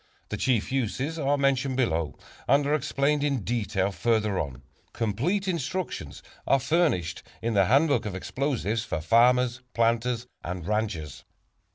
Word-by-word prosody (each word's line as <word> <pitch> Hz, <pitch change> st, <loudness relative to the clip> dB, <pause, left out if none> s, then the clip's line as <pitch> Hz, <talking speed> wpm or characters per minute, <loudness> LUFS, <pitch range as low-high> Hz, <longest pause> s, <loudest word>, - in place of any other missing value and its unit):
The -, -, -3 dB
chief 125 Hz, -4 st, +1 dB
uses 135 Hz, +5 st, -1 dB
are 145 Hz, 0 st, +2 dB
mentioned 135 Hz, -1 st, +1 dB
below 80 Hz, -, 0 dB, 0.3 s
and 140 Hz, +2 st, +4 dB
are 145 Hz, -, +1 dB
explained 145 Hz, -1 st, +1 dB
in 140 Hz, -7 st, 0 dB
detail 100 Hz, -4 st, 0 dB
further 105 Hz, +1 st, +1 dB
on. 70 Hz, -3 st, -5 dB, 0.3 s
Complete 135 Hz, -, -1 dB
instructions 170 Hz, -, -3 dB, 0.2 s
are 135 Hz, -, +4 dB
furnished 140 Hz, -, +1 dB, 0.2 s
in 115 Hz, 0 st, -1 dB
the 100 Hz, -2 st, +4 dB
"Handbook 140 Hz, -, +3 dB
of 100 Hz, -, -4 dB
Explosives 115 Hz, 0 st, -1 dB
for 85 Hz, -, -3 dB
Farmers, 120 Hz, +7 st, +3 dB
Planters 115 Hz, +1 st, +1 dB, 0.2 s
and 90 Hz, -1 st, -5 dB
Ranchers." 100 Hz, -9 st, -2 dB
120 Hz, 140 wpm, -27 LUFS, 100-140 Hz, 0.3 s, and